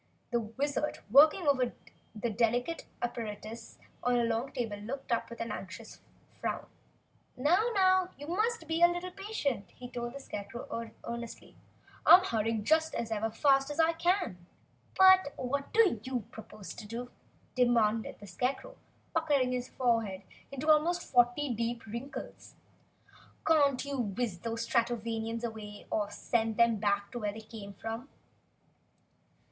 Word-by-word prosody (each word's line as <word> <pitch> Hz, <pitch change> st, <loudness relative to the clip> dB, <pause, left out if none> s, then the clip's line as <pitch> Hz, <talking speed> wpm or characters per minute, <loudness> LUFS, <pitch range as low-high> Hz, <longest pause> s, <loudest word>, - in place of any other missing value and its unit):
The 240 Hz, -, +2 dB
Wizard, 275 Hz, +7 st, -2 dB
working 305 Hz, -, +7 dB
over 255 Hz, -4 st, +3 dB, 0.4 s
the 225 Hz, +2 st, -2 dB
delicate 245 Hz, +8 st, 0 dB, 0.2 s
apparatus 225 Hz, -1 st, -5 dB, 0.2 s
on 245 Hz, 0 st, +2 dB
a 240 Hz, -, +3 dB
long 230 Hz, +4 st, -1 dB
table, 230 Hz, -6 st, -3 dB
looked 250 Hz, +6 st, -6 dB
up 235 Hz, -, 0 dB
with 235 Hz, -, -9 dB
an 230 Hz, -1 st, -3 dB
anxious 205 Hz, +3 st, -8 dB, 0.4 s
frown. -, -, -2 dB, 0.7 s
"Now, 355 Hz, -, +3 dB
now, 375 Hz, -1 st, +4 dB
you 290 Hz, -, -8 dB
must 415 Hz, +2 st, -1 dB
be 325 Hz, +1 st, -1 dB
a 345 Hz, -, +9 dB
little 350 Hz, +1 st, -3 dB
patient," 360 Hz, -, -3 dB
he 250 Hz, -, -8 dB
told 240 Hz, 0 st, -5 dB
the -, -, -5 dB
Scarecrow, 230 Hz, 0 st, -6 dB
earnestly. 235 Hz, 0 st, -7 dB, 0.5 s
"I'm 365 Hz, +1 st, +9 dB
hurrying 225 Hz, -, 0 dB
just 315 Hz, +5 st, +2 dB
as 230 Hz, -, -2 dB, 0.3 s
fast 275 Hz, -1 st, +4 dB
as 295 Hz, +2 st, -5 dB
ever 325 Hz, 0 st, +5 dB
I -, -, -8 dB
can." 330 Hz, -, 0 dB, 0.5 s
"But 375 Hz, -5 st, +7 dB
what 275 Hz, +2 st, -2 dB
do 425 Hz, -, +4 dB
you 255 Hz, +1 st, -2 dB
propose 215 Hz, -2 st, -9 dB
to 215 Hz, -, -9 dB
do?" 240 Hz, +3 st, -6 dB, 0.4 s
demanded 230 Hz, -3 st, +2 dB
the 205 Hz, -, -10 dB
Scarecrow, 255 Hz, -, -3 dB, 0.4 s
puckering 290 Hz, -6 st, +2 dB
his 250 Hz, 0 st, -2 dB
forehead 225 Hz, -6 st, 0 dB, 0.3 s
into 275 Hz, +2 st, -5 dB
almost 340 Hz, +3 st, +3 dB
forty 245 Hz, +2 st, +3 dB
deep 230 Hz, +1 st, -2 dB
wrinkles. 235 Hz, +7 st, -7 dB, 0.9 s
"Can't 285 Hz, -5 st, +3 dB
you 280 Hz, -1 st, -3 dB
whiz 220 Hz, -3 st, -2 dB
these 230 Hz, +3 st, -3 dB
Stratovanians 230 Hz, -1 st, -1 dB
away, 215 Hz, -3 st, -6 dB
or 205 Hz, -1 st, 0 dB
send 225 Hz, +1 st, -1 dB
them 235 Hz, -1 st, +4 dB
back 200 Hz, 0 st, 0 dB
where 210 Hz, -4 st, -2 dB
they 220 Hz, -, -8 dB
came 210 Hz, -2 st, -10 dB
from?" 225 Hz, +6 st, -6 dB
240 Hz, 145 wpm, -31 LUFS, 225-290 Hz, 0.9 s, a